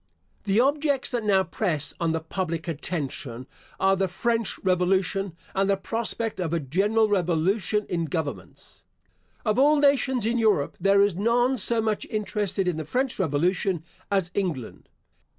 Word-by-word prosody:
The 200 +2 +2
objects 285 +1 +2
that 240 -3 -1
now 195 -2 +3
press 170 -4 -1
on 165 -1 +1
the 160 - 0
public 165 0 -4
attention 140 -6 -4 0.3
are, 195 0 +3
the 190 0 0
French 230 +4 -1
revolution, 185 0 +1 0.2
and 195 +1 +1
the 200 - +3
prospect 225 +1 -2
of 170 -3 -2
a 170 - +1
general 200 - +1
revolution 195 +3 +1
in 170 -2 -1
governments. 160 -3 -6 0.6
Of 215 +2 +1
all 295 +3 +5
nations 270 -4 +2
in 235 +2 +1
Europe 210 -11 +2
there 200 0 +4
is 200 -2 +2
none 235 +7 +2
so 225 +3 +2
much 215 -2 -1
interested 205 -3 -2
in 175 -3 0
the 160 - -3
French 255 - -1
revolution 175 +2 0 0.3
as 190 -3 0
England. 170 - -4
195 Hz, 150 wpm, -25 LUFS, 170-225 Hz, 0.6 s, all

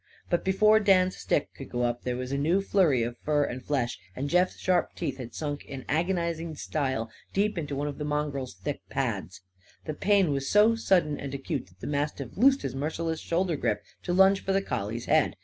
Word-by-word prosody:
But 175 - +2
before 215 +3 +5
Dan's 185 -3 +4
stick 145 - -1
could 135 - -10
go 120 0 -1
up 120 0 0
there 125 -1 -2
was 125 +1 -4
a 140 - 0
new 165 +7 +3
flurry 180 - +3
of 120 +1 -4
fur 150 -1 +1
and 130 -2 -4
flesh, 130 -5 -1 0.2
and 140 +2 -3
Jeff's 180 +1 +3
sharp 185 -1 +1
teeth 145 -6 -3
had 120 -3 -8
sunk 145 -2 -3
in 135 -2 -8
agonising 170 0 -1
style 130 -7 -2 0.2
deep 210 +2 +1
into 145 -5 -3
one 145 +2 -2
of 145 0 -5
the - - -2
mongrel's 145 -6 -2
thick 95 +10 -4
pads. 100 - -3 0.4
The 155 - -3
pain 195 0 +3
was 135 -1 -1
so 210 +2 +6
sudden 180 -9 +2
and 140 0 -5
acute 135 - -3
that 90 +1 -24
the - - -6
mastiff 145 -3 -2
loosed 270 +6 +4
his 130 - -3
merciless 160 +4 -2
shoulder 170 0 0
grip, 105 -7 -1 0.2
to - - -3
lunge 190 +2 +5
for 195 - 0
the 195 - +3
collie's 115 - -3
head. 155 -2 +3
150 Hz, 210 wpm, -28 LUFS, 130-180 Hz, 0.4 s, so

